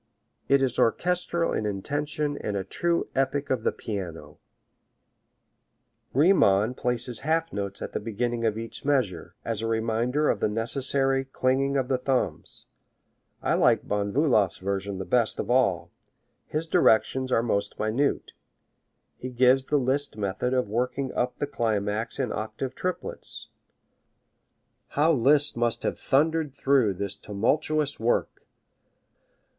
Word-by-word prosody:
It 140 0 +4
is 130 -3 0
orchestral 170 +6 +1
in 110 - -1
intention 145 +8 -2
and 105 -1 -3
a 95 - -2
true 170 - -1
epic 135 +1 -1
of 130 -3 +1
the - - +1
piano. 85 -8 -6 1.7
Riemann 125 - +4
places 125 -1 -1
half 165 +2 0
notes 100 -1 -4
at - - -6
the - - -1
beginning 115 +2 -2
of 110 -1 +1
each 115 +2 -7
measure, 125 - -1
as 115 -2 -2
a 115 - -2
reminder 115 +6 0
of - - +1
the - - +1
necessary 135 +4 0
clinging 135 +1 0
of 130 -2 0
the 130 -1 0
thumbs. 130 0 -2 0.8
I - - +1
like - - +3
Von 100 0 -1
Bulow's 110 - +2
version 100 +1 -3
the 95 - -5
best 120 -3 +1
of - - -2
all. 120 -9 +2 0.6
His 155 +2 -2
directions 130 -2 +3
are 115 - +3
most 100 -4 -1
minute. 115 +7 0 0.9
He 130 - -6
gives 130 +1 +3
the 150 - +1
Liszt 135 -1 -1
method 100 +4 -2
of 125 -4 +1
working 125 +5 -2
up 125 0 -1
the - - -1
climax 110 -4 -1
in 130 -5 -1
octave 110 +4 -4
triplets. 185 +5 -5 1.4
How 155 +3 +2
Liszt 145 +2 +4
must 120 -1 0
have - - -2
thundered 155 0 +1
through 130 -9 +2
this 100 +1 -3
tumultuous 145 +8 0
work! 115 +2 -1
125 Hz, 140 wpm, -26 LUFS, 110-140 Hz, 1.7 s, It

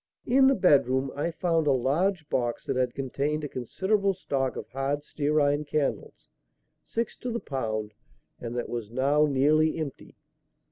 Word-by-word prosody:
In 265 +2 +5
the 270 - +4
bedroom 135 - +3
I 145 +4 -1
found 165 -1 0
a - - +5
large 155 +7 +1
box 120 -4 -1
that - - -1
had 125 -1 0
contained 140 +3 -2
a - - -2
considerable 195 - 0
stock 135 -7 -2
of - - -6
hard 135 +2 -2
stearine 145 0 +1
candles, 145 -1 -3 0.6
six 230 0 -3
to 250 - -5
the 235 0 -2
pound, 110 - -3 0.5
and 120 0 -6
that 120 - -2
was 115 -3 -5
now 140 +5 +2
nearly 150 +3 +3
empty. 155 -4 -6
145 Hz, 155 wpm, -27 LUFS, 130-160 Hz, 0.6 s, In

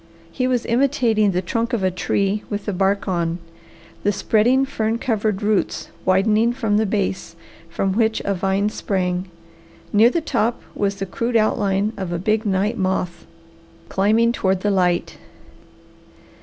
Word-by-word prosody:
He 255 +8 -1
was 250 -2 0
imitating 235 -4 +2
the 185 -1 -1
trunk 230 +7 -2
of 220 -5 0
a 185 - +2
tree 200 +3 0
with 205 -1 -4
the 205 - -2
bark 195 +2 0
on, 170 -2 -1 0.6
the 205 - +2
spreading, 235 +6 +2
fern 225 -4 -1
covered 215 -4 -1
roots 210 -2 0 0.2
widening 210 +5 +3
for 230 -4 -3
the 215 +1 +3
base, 190 -4 -2 0.3
from 190 +3 -1
which 220 +1 +1
a 200 - +1
vine 195 +2 0
sprang. 185 -2 -2 0.6
Near 220 +3 +6
the 335 - 0
top 240 -7 -1
was 200 -1 -1
the 195 - -4
crude 230 +5 -3
outline 205 -1 +1
of 190 -3 -4
a 175 - -1
big 215 +4 0
night 200 +4 0
moth 185 -2 -2 0.6
climbing 220 +4 +3
toward 190 -5 0
the 205 - +1
light. 180 -2 0
205 Hz, 155 wpm, -21 LUFS, 190-225 Hz, 0.6 s, Near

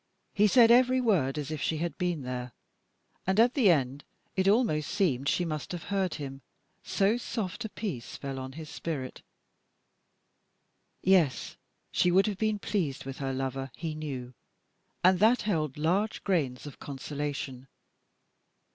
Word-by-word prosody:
He 210 +1 +4
said 235 +2 +6
every 255 +1 +5
word 175 - +2
as 150 0 -3
if 155 -2 -4
she 155 +2 0
had 165 -1 -2
been 175 -5 -1
there, 125 -1 -5 0.7
and 190 +2 +2
at 240 +2 +5
the 245 -9 +4
end 140 -3 +1 0.3
it 190 0 +2
almost 195 - +3
seemed 140 - +1
she 180 - +1
must 155 -3 -4
have 175 - -5
heard 190 -3 0
him, 135 -2 -6 0.4
so 200 +4 +2
soft 220 -5 -4
a - - -4
peace 185 - -5
fell 135 -1 -5
on 130 0 -6
his 155 +1 -8
spirit. 150 -4 -5 1.8
Yes, 175 -8 +3 0.4
she 180 - +3
would 190 +2 +5
have 205 -3 -2
been 215 -1 +1
pleased 185 -11 -2
with 135 0 -6
her 135 -1 -2
lover, 135 0 -3
he 165 -2 -4
knew, 135 -5 -5 0.7
and 185 0 +5
that 225 +5 +4
held 155 -10 -1
large 185 +8 0
grains 145 -10 0
of 145 - -9
consolation. 140 -2 -5
160 Hz, 155 wpm, -29 LUFS, 135-200 Hz, 1.8 s, said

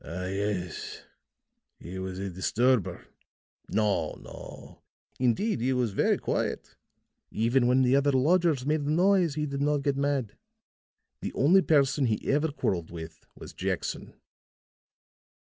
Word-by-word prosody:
"Ah, 90 +3 -5
yes. 95 -2 -3 0.8
He 95 +2 -7
was 95 0 -5
a 100 0 -4
disturber." 115 +4 +1 0.6
"No, 105 -2 0
no. - - -11 0.4
Indeed, 125 - +1
he 130 +2 +1
was 125 -4 0
very - - +2
quiet. - - -3 0.5
Even 120 +3 +2
when 130 +1 +4
the 125 +1 +4
other 140 +1 +3
lodgers 150 0 +2
made 150 +1 +1
a 145 - -3
noise 175 -1 +3
he 150 -1 -1
did 140 -1 -4
not 145 -1 +1
get 140 -1 +1
mad. 140 -6 -1 0.9
The - - -4
only 175 +9 +5
person 140 -4 +3
he 110 -2 -2
ever 150 +2 +1
quarreled 90 - -2
with 80 -1 -10
was - - -11
Jackson." - - -4
130 Hz, 135 wpm, -28 LUFS, 100-145 Hz, 0.9 s, only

